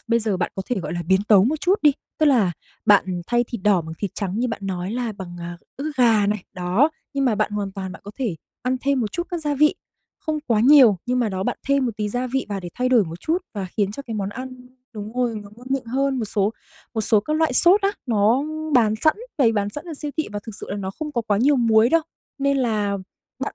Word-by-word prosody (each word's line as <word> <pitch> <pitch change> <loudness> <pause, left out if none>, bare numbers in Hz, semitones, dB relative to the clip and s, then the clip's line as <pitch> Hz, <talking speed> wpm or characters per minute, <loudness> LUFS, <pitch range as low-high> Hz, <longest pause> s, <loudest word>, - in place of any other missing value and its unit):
bây 230 - +4
giờ 215 -3 0
bạn 180 -1 -2
có 190 - -3
thể 250 - -1
gọi 155 -3 -5
là 175 0 -3
biến 190 +4 +2
tấu 200 -3 +7
một 295 +6 0
chút 370 +2 +3
đi, 295 - +6 0.3
tức 310 - +4
là 230 -11 +4 0.3
bạn 190 -3 +4
thay 240 0 +2
thịt 235 -4 -7
đỏ 200 -3 +4
bằng 160 0 -7
thịt 200 - -2
trắng, 200 0 -3
như 250 - +1
bạn 225 - -4
nói 185 0 -3
là, 240 -2 -2
bằng, 185 -3 -8
à, 170 0 -6 0.2
ức 295 +3 -3
gà 225 -5 +4
này, 210 -2 -1
đó. 185 - +2 0.2
Nhưng 275 -1 +1
mà 245 -4 +3
bạn 210 - 0
hoàn 200 -2 -3
toàn 190 -2 -5
bạn - - -12
có 205 - -7
thể 230 -11 -1 0.3
ăn 255 +1 0
thêm 275 -1 +1
một 215 -3 -2
chút 345 - -1
các 350 - -2
gia 300 -2 -1
vị, 300 +2 +4 0.4
không 310 -1 -2
quá 225 -3 +2
nhiều, 255 -5 +7
nhưng 250 +1 +1
mà 235 -3 +1
đó 190 -1 -3
bạn - - -2
thêm 280 -2 +3
một 235 - -2
tí 210 -1 -2
gia 245 +4 -2
vị 265 +2 -2
vào, 200 -2 -3
để 175 - -6
thay 250 0 0
đổi 245 -5 +5
một 165 +1 -8
chút 330 +3 0 0.2
và 200 -3 -3
khiến 205 -2 +1
cho 280 - -7
cái 230 -5 -6
món 200 -2 -2
ăn 255 +2 -8 0.3
đúng 210 -1 -7
rồi, 245 -2 0
nó 200 - -13
ngon 245 +2 -14
miệng 270 -1 0
hơn. 265 +3 0
Một 230 - -1
số 205 0 0 0.4
một 220 - 0
số 215 0 +3
các 305 +9 -1
loại 320 -4 +2
sốt 350 +10 +5
á, 395 - +3 0.2
nó 225 +3 +3 0.3
bán 220 -4 +4
sẵn, 310 - +4 0.2
bày 235 -5 +4
bán 205 -2 0
sẵn 295 - -7
ở 335 -3 -6
siêu 295 0 -5
thị, 315 - -1
và 205 - -3
thực 225 - -6
sự - - -8
là 200 - -2
nó 190 -2 -4
không 300 +9 -6
có 235 - -1
quá 210 -3 +1
nhiều 280 +5 +4
muối 225 -2 +4
đâu, 330 +4 +3 0.4
nên 280 0 +2
là 215 -6 0 0.4
bạn, - - -4
230 Hz, 275 wpm, -22 LUFS, 200-265 Hz, 0.4 s, tấu